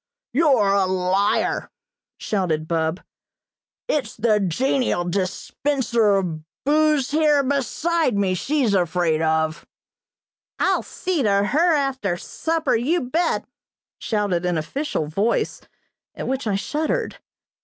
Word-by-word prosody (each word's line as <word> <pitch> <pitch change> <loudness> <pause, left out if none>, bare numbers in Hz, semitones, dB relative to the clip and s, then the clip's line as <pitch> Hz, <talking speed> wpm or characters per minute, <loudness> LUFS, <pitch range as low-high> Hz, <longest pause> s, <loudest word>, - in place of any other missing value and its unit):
"You're 255 -9 +3
a 195 -2 +2
liar!" 190 +2 0 0.5
shouted 165 -6 -1
Bub. 160 +1 -1 0.9
"It's 260 -8 -1
the 215 -1 +2
genial 220 - 0
dispenser 210 +5 0
of 175 -5 -1 0.3
booze 300 -2 +2
here 300 -2 +3
beside 285 +1 0
me 195 -2 +1
she's 260 - 0
afraid 175 -3 +1
of." 160 0 0 0.9
"I'll - - +2
see 360 -5 -2
to 200 -4 +3
her 320 +9 +3
after 265 -10 -1
supper, 325 - -1
you 295 +10 +1
bet!" 335 +3 +1 0.5
shouted 205 -6 -1
an 180 -2 0
official 165 - -2
voice, 200 +10 -1 0.5
at - - -5
which 265 -2 -2
I 200 - +1
shuddered. 315 - -2
215 Hz, 110 wpm, -22 LUFS, 180-290 Hz, 0.9 s, You're